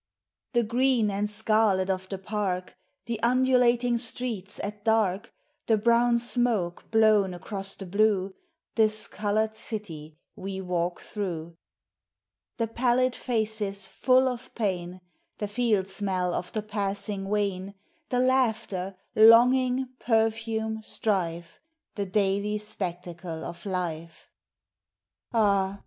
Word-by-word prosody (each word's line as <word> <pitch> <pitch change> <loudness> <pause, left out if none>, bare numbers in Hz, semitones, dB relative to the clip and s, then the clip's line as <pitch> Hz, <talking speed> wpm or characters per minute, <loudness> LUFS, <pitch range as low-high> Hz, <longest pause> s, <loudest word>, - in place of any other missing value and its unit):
The 240 -1 +3
green 240 -1 +2
and 205 +1 -1
scarlet 215 -3 +2
of 190 -1 -2
the 195 - -3
Park, 190 -2 -3 0.3
The 230 -2 -3
undulating 245 -1 +3
streets 225 -4 -2
at 205 +1 -5
dark, 220 -2 +1 0.4
The 225 - +4
brown 235 +2 +3
smoke 235 -7 -1
blown 215 -4 +4
across 195 +2 -5
the 195 - -8
blue, 200 0 +1 0.4
This 215 -1 +2
colored 215 +1 -1
city 160 -10 -7 0.2
we 190 0 -5
walk 180 -1 -2
through; 170 -5 -5 0.5
— - - -61
The 230 - +1
pallid 245 +2 +1
faces 215 -4 -2
full 255 +6 +3
of 250 -1 -5
pain, 185 -4 -2 0.4
The 210 - -3
field 210 -3 +1
smell 190 -2 -1
of 180 - -3
the 215 - -3
passing 200 -1 -3
wain, 200 -2 -1 0.3
The 250 0 +1
laughter, 220 -7 0 0.2
longing, 250 +3 +6
perfume, 220 -1 0
strife, 175 -6 -2 0.3
The 200 -2 -3
daily 200 +1 +1
spectacle 180 -5 -5
of 170 +3 -8
life; 170 -3 -4 0.5
— - - -65
Ah 200 -4 +2
210 Hz, 120 wpm, -27 LUFS, 190-230 Hz, 0.5 s, longing